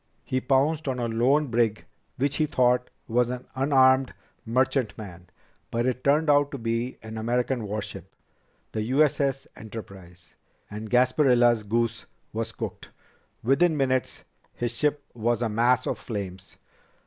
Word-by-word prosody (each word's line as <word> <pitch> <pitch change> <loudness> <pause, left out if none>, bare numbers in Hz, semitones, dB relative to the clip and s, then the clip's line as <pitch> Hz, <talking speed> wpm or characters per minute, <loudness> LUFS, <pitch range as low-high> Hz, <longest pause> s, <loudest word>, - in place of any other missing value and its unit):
He 130 0 -1
pounced 140 +4 +1
on 130 -1 -1
a 120 -1 -1
lone 125 +7 +2
brig 115 -2 +1 0.3
which 140 +2 0
he 155 - +2
thought 125 -3 +2 0.2
was 120 +1 +2
an 125 0 -5
unarmed 130 -1 +3 0.3
merchantman, 115 -8 -1 0.4
but 120 +1 -1
it 130 0 -1
turned 150 +3 +3
out 145 -1 +4
to 140 - -6
be 115 +1 -2
an 110 0 -6
American 120 +1 0
warship, 100 -3 -6 0.6
the 110 - -2
U.S.S. 135 +2 +1
Enterprise. 95 -6 -11 0.4
And 105 +1 -6
Gasparilla's 125 -2 +4
goose 115 +2 -1 0.3
was 115 +1 -3
cooked. - - -7 0.5
Within 155 +6 +3
minutes, 130 -2 0 0.3
his 120 -1 -2
ship 145 +3 0
was 120 +1 0
a 115 - 0
mass 120 +3 +2
of - - -2
flames." 95 -4 -6
125 Hz, 135 wpm, -26 LUFS, 110-135 Hz, 0.6 s, out